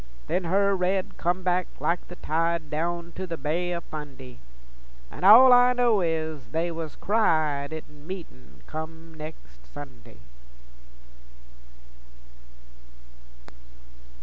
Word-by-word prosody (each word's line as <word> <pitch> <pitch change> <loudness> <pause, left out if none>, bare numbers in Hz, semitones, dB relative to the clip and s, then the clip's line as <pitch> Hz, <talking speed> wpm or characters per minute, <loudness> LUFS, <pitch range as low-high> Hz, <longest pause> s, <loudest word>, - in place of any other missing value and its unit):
Then 185 - -1
her 200 +3 +2
red 185 +1 -1
come 180 +2 0
back 180 0 +1
like 170 +1 -1
the 175 - -10
tide 165 -1 -1
Down 170 +2 -2
to 185 +2 -6
the 165 -2 -4
Bay 165 +5 -1
o' 170 - -4
Fundy, 135 -6 -9 0.7
An' - - -9
all 245 +6 +9
I 245 0 +6
know 240 -5 +3
is 160 -4 -2
they 165 +2 -1
was 160 -2 -6
cried 155 -9 +1
In 150 -1 -10
meetin' 65 - -10
come 160 +1 -8
nex' 150 - -11
Sunday. - - -12
165 Hz, 115 wpm, -26 LUFS, 150-180 Hz, 0.7 s, all